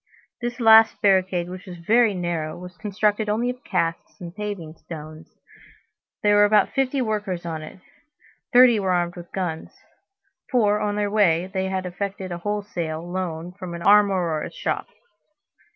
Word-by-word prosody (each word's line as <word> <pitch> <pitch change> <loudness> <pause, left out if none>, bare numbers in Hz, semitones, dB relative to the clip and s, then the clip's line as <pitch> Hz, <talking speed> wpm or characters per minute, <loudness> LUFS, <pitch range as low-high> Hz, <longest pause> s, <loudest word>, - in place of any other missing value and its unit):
This 240 +1 -4
last 225 -1 +6
barricade, 185 -3 +2
which 185 +2 -9
was 180 -1 -8
very 220 +4 +3
narrow, 170 -3 -3
was 180 0 -10
constructed 210 +1 -1
only 235 +4 0
of 250 0 -13
casks 165 -4 -2
and 175 0 -9
paving 200 -7 -5
stones. 155 -1 -11 0.9
There 205 0 +4
were 205 - +6
about 205 -1 +4
fifty 270 0 0
workers 210 -6 -3
on 160 -2 -4
it; 155 - -10 0.7
thirty 245 -3 +6
were 190 -2 0
armed 175 -1 0
with 175 -1 -11
guns; 175 -4 -4 0.7
for, 210 -6 +2
on 205 -1 -1
their 205 -1 -1
way, 185 -4 +2
they 190 -1 -1
had 190 -1 -2
effected 190 +1 -5
a 175 - -4
wholesale 175 -5 -4
loan 175 -2 -4
from 180 -2 -8
an 170 - -7
armorer's 190 -6 +3
shop. - - -2
190 Hz, 155 wpm, -23 LUFS, 175-210 Hz, 0.9 s, last